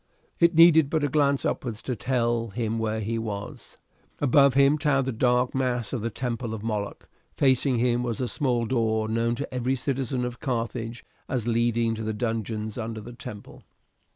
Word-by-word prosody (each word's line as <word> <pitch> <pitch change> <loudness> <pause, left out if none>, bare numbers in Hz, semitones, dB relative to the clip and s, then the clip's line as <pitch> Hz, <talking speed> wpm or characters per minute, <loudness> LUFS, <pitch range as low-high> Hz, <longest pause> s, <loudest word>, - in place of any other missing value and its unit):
It 170 0 +4
needed 160 -3 +7
but 155 -1 0
a - - +3
glance 140 -1 +2
upwards 115 -4 -2
to 125 - -2
tell 120 -1 0
him 115 +1 -2
where 110 0 -1
he 115 +2 -2
was. 105 -2 -7 0.4
Above 140 -1 +4
him 140 +2 +4
towered 140 -3 +2
the 130 - -1
dark 125 +1 +1
mass 125 -3 -1
of 125 - -2
the 115 - -1
temple 115 0 -3
of 105 - -8
Moloch, 105 -3 -4 0.3
facing 130 -1 +3
him 120 0 +2
was 120 -2 -3
a 125 - -1
small 125 -4 0
door 110 -2 0
known 115 +1 0
to 140 +1 -6
every 125 +1 0
citizen 130 -1 -2
of 125 0 -6
Carthage 115 -2 -3 0.2
as 125 -4 -1
leading 115 -1 +1
to 110 - -5
the 110 0 -2
dungeons 110 -1 -3
under 110 -1 -4
the 120 +3 -9
temple. 105 -3 -10
120 Hz, 180 wpm, -26 LUFS, 115-130 Hz, 0.4 s, needed